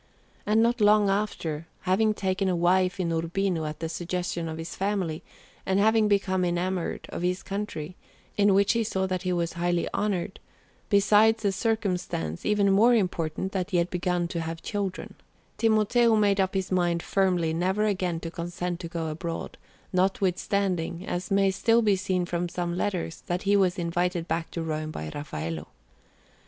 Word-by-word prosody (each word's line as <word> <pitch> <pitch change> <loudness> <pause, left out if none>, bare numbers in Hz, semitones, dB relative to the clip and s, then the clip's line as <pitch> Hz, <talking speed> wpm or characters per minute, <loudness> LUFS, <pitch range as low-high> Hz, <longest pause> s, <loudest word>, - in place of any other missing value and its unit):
And 220 +2 +4
not 235 0 +1
long 210 -1 +5
after, 170 -6 -2
having 210 +4 +2
taken 190 -1 0
a 180 - +1
wife 180 +2 +2
in 170 -2 0
Urbino 165 +1 -1
at 150 +1 -6
the 165 - -1
suggestion 175 0 -3
of 160 - -5
his 165 +1 -6
family, 190 -5 -1 0.4
and 190 +1 +1
having 220 +1 +4
become 195 -2 +1
enamoured 180 0 -1
of - - -5
his 180 +1 -1
country, 190 -5 -5 0.4
in 200 -1 +4
which 200 +1 +4
he 230 -1 +1
saw 190 -3 -1
that 185 -1 -2
he 185 -1 -1
was 170 -1 -1
highly 175 0 0
honoured, 200 -2 -1 0.5
besides 215 +2 +4
the 200 - +2
circumstance, 185 - -2
even 205 -1 +3
more 230 +5 +5
important, 180 -3 -1
that 185 -1 -2
he 185 - +1
had 170 +1 +1
begun 180 -1 0
to 170 - -3
have 165 0 -5
children, 200 -3 -3 0.5
Timoteo 225 +1 +3
made 205 -2 +3
up 190 0 +1
his 190 0 -1
mind 175 -2 +1
firmly 180 -4 +1
never 190 +5 +1
again 185 -5 0
to 165 - -5
consent 175 0 -4
to 175 - -5
go 165 -1 -4
abroad, 165 +2 -5 0.4
notwithstanding, 185 -2 0
as 180 +1 -3
may 195 0 +3
still 230 +4 +3
be 205 -2 +4
seen 185 -2 -1
from 175 0 -2
some 175 0 -3
letters, 180 -3 -2
that 175 +1 -2
he 200 0 +3
was 190 -1 +3
invited 175 0 -1
back 165 0 -2
to 165 - -4
Rome 155 -1 -3
by 80 - -6
Raffaello. 80 - -5
185 Hz, 170 wpm, -27 LUFS, 170-200 Hz, 0.5 s, long